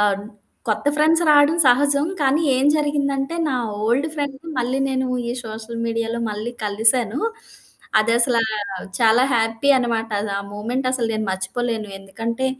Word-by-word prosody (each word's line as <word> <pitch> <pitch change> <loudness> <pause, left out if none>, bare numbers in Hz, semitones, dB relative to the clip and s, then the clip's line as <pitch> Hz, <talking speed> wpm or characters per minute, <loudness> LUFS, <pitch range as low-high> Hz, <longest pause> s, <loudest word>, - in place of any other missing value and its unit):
ఆహ్, 200 -1 +1 0.5
కొత్త 215 +5 -1
ఫ్రెండ్స్ 320 +3 +3
రావడం 295 +2 +5
సహజం. 280 +4 +4
కానీ 285 +3 +2
ఏం 270 - +2
జరిగిందంటే 285 0 -1
నా 260 - 0 0.3
ఓల్డ్ 270 +7 +1
ఫ్రెండ్‌ని 285 +2 -5
మళ్ళీ 250 +2 0
నేను 260 -1 -1 0.2
ఈ - - -1
సోషల్ 225 +1 -6
మీడియాలో 230 0 -2
మళ్ళీ 215 +3 -4
కలిసాను. 220 +4 +1 0.8
అదసలా 230 +1 +2 0.6
చాలా 230 +2 +5
హ్యాపీ 225 +4 +1
అనమాట. 225 -2 -1 0.3
ఆ - - -3
మూవ్మెంటసలు 245 +3 -1
నేను 215 -1 -2
మర్చిపోలేను. 215 +3 -3
ఎందుకంటే 230 +6 -3
240 Hz, 130 wpm, -21 LUFS, 225-275 Hz, 0.8 s, రావడం